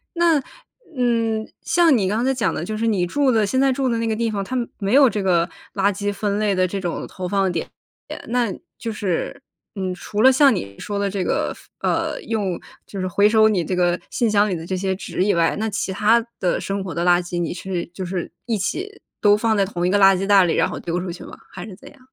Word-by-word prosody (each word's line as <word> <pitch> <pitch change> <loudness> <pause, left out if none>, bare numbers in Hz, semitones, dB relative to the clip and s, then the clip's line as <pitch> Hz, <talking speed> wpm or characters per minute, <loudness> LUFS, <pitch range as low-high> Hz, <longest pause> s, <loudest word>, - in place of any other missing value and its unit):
那， 335 -4 +3 0.6
嗯， 230 -3 0 0.2
像 330 -5 +4
你 195 -4 +1
刚 220 +5 0
才 265 - +2
讲 230 -6 0
的 160 - -3
就 215 +4 -4
是 225 +2 -1
你 195 -6 +1
住 275 +7 +1
的 220 -3 +2
现 260 +6 0
在 270 0 +3
住 265 0 0
的 230 -2 0
那 230 - -1
个 220 - 0
地 230 0 0
方， 200 -2 -2
它 255 +6 -4 0.2
没 200 +2 -1
有 275 -1 +7
这 210 - -2
个 175 -3 +2 0.3
垃 200 0 +2
圾 205 +1 -2
分 205 0 -2
类 210 -2 +1
的 185 0 +2
这 195 +2 -4
种 175 -3 -3
投 180 -1 -6
放 195 -1 +1
点， 165 - -3 0.6
那 235 -4 0 0.3
就 230 - -4
是， 200 +4 -3 0.3
嗯， 185 -2 -3
除 205 +4 -3
了 260 +2 +8
像 270 -1 +5
你 100 - -6
说 205 -1 -4
的 200 0 0
这 195 -2 -2
个 - - -1
分 - - -5
呃， - - -2
用 200 -6 -2 0.3
就 195 - -6
是 185 - -1
回 200 +3 +4
收 220 0 +5
你 190 -6 +1
这 185 - -2
个 175 0 +1
信 235 -3 +1
箱 210 0 +3
里 - - 0
的 165 - -7
这 185 - -2
些 190 +1 -1
纸 185 -1 -2
以 205 - +2
外， 165 -1 +2
那 220 +1 -1
其 200 -1 -2
它 225 +4 +3 0.2
的 180 - 0
生 195 0 -3
活 180 - -5
的 170 - -1
垃 175 0 +4
圾 175 0 -4
你 170 0 -2
是 180 -1 -4
就 185 - -5
是 180 -2 -4
一 225 -3 0
起 395 - -4 0.2
都 205 -1 +5
放 220 0 +1
在 200 - +3
同 175 -3 -2
一 180 - +1
个 205 - +3
垃 195 -1 +6
圾 195 +2 -2
袋 200 -2 +6
里， 170 - +1
然 - - +2
后 - - -5
丢 175 +1 -2
出 180 -1 -4
去 - - -10
吗？ - - -10
还 180 - -8
是 200 -4 -10
怎 - - -14
样？ 285 - -20
200 Hz, 275 characters per minute, -21 LUFS, 185-225 Hz, 0.6 s, 了